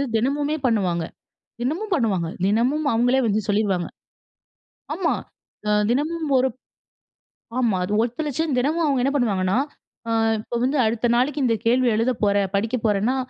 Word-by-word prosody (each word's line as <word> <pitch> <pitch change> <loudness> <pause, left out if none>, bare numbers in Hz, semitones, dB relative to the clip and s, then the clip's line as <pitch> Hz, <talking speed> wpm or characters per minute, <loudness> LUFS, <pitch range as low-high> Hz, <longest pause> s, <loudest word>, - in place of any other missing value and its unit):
தினமுமே 285 +6 0
பண்ணுவாங்க. 185 -8 +1 0.6
தினமும் 350 - -2
பண்ணுவாங்க. 195 - 0 0.2
தினமும் 250 +9 +1
அவுங்களே 245 +3 +3
வந்து 215 0 +1
சொல்லிருவாங்க. 200 -4 +1 1.1
ஆமா. 335 0 0 0.5
அ - - +2 0.2
தினமும் 310 +4 -1
ஒருப் 255 -1 0 1.0
ஆமா. 230 -6 +2
அது 205 - -3
ஒத்துழச்சேன், 290 +4 -2
தினமும் 315 +6 +1
அவுங்க 270 -3 +1
என்ன 275 +2 +1
பண்ணுவாங்கன்னா, 195 -5 +1 0.5
"அ - - -1 0.3
இப்போ 235 - -5
வந்து 275 +3 +1
அடுத்த 235 +2 0
நாளைக்கு 275 +3 +1
இந்த 230 -2 +2
கேள்வி 250 +1 +3
எழுதப் 235 +1 0
போற, 200 -1 +3 0.2
படிக்க 225 +5 0
போறன்னா, 215 +5 +1
245 Hz, 135 wpm, -23 LUFS, 215-285 Hz, 1.1 s, அவுங்களே